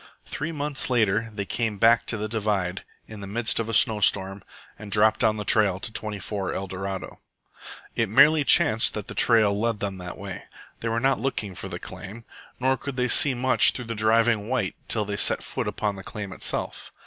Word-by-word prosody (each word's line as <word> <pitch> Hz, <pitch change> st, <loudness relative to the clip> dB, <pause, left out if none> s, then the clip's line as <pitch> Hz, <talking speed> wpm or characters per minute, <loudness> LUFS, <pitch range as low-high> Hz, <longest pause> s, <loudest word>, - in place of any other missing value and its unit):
Three 155 Hz, +3 st, -5 dB
months 145 Hz, -3 st, -2 dB
later 115 Hz, -2 st, +1 dB
they 100 Hz, -2 st, -5 dB
came 110 Hz, 0 st, -2 dB
back 115 Hz, +2 st, +3 dB
over 110 Hz, -2 st, -4 dB
the -, -, -2 dB
divide 100 Hz, -4 st, -2 dB, 0.2 s
in 110 Hz, -1 st, -10 dB
the 100 Hz, -, -7 dB
midst 115 Hz, +4 st, 0 dB
of 115 Hz, 0 st, -3 dB
a -, -, -3 dB
snow 110 Hz, 0 st, +3 dB
storm 95 Hz, 0 st, +1 dB, 0.4 s
and 105 Hz, -1 st, -10 dB
dropped 110 Hz, +1 st, +3 dB
down 110 Hz, -2 st, +2 dB
the 105 Hz, -, -5 dB
trail 100 Hz, -4 st, +4 dB
to 110 Hz, -, -4 dB
24 105 Hz, -2 st, -3 dB
ELDORADO. 95 Hz, 0 st, -6 dB, 0.8 s
It 115 Hz, -3 st, 0 dB
merely 145 Hz, +7 st, +5 dB
chanced 115 Hz, -4 st, +3 dB
that 105 Hz, -2 st, -5 dB
the -, -, -8 dB
trail 110 Hz, -4 st, +3 dB
led 115 Hz, 0 st, -1 dB
them 100 Hz, -2 st, -4 dB
that 90 Hz, 0 st, -8 dB
way. 100 Hz, -2 st, -8 dB, 0.3 s
They 115 Hz, -, -3 dB
were 115 Hz, +1 st, 0 dB
not 135 Hz, +2 st, +1 dB
looking 110 Hz, -6 st, -3 dB
for -, -, -7 dB
the -, -, -5 dB
claim. 115 Hz, +4 st, -10 dB, 0.3 s
Nor 130 Hz, +1 st, +1 dB
could 140 Hz, 0 st, -7 dB
they 125 Hz, -1 st, 0 dB
see 135 Hz, +1 st, +5 dB
much 130 Hz, +1 st, +4 dB
through 125 Hz, -, -7 dB
the 115 Hz, -, -4 dB
driving 110 Hz, 0 st, +2 dB
white 130 Hz, 0 st, -1 dB
till 110 Hz, -2 st, 0 dB
they 100 Hz, 0 st, -4 dB
set -, -, +2 dB
foot -, -, -4 dB
upon 105 Hz, -2 st, -3 dB
the 95 Hz, -, -9 dB
claim 100 Hz, -2 st, -7 dB
itself. -, -, -3 dB
110 Hz, 205 wpm, -24 LUFS, 100-115 Hz, 0.8 s, merely